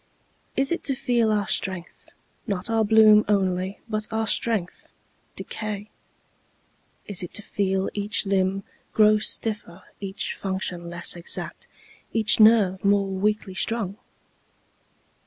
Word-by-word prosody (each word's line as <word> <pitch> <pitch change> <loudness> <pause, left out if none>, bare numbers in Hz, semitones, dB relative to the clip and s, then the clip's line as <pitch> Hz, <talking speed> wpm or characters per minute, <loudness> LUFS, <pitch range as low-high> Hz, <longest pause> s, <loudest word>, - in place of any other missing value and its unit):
Is 270 +3 +2
it 340 - -2
to 270 - 0
feel 235 -3 +1
our 210 -2 0
strength 185 -3 -2 0.4
Not 200 0 -3
our 225 -1 +2
bloom 215 0 +6
only, 190 -1 0
but 215 -1 -2
our 220 0 -1
strength 220 -5 0 0.5
decay? 215 -1 -6 1.1
Is 200 -3 -3
it 180 - -7
to 210 - -4
feel 190 -1 -1
each 205 0 -1
limb 195 0 0 0.3
Grow 215 0 +5
stiffer, 210 -5 -4
every 195 -1 -6
function 185 -3 -4
less 175 +1 0
exact, 170 -1 -4 0.5
Each 220 -1 +5
nerve 215 -4 +5
more 200 0 +3
loosely 200 +1 -1
strung? 205 0 -1
205 Hz, 120 wpm, -24 LUFS, 190-215 Hz, 1.1 s, bloom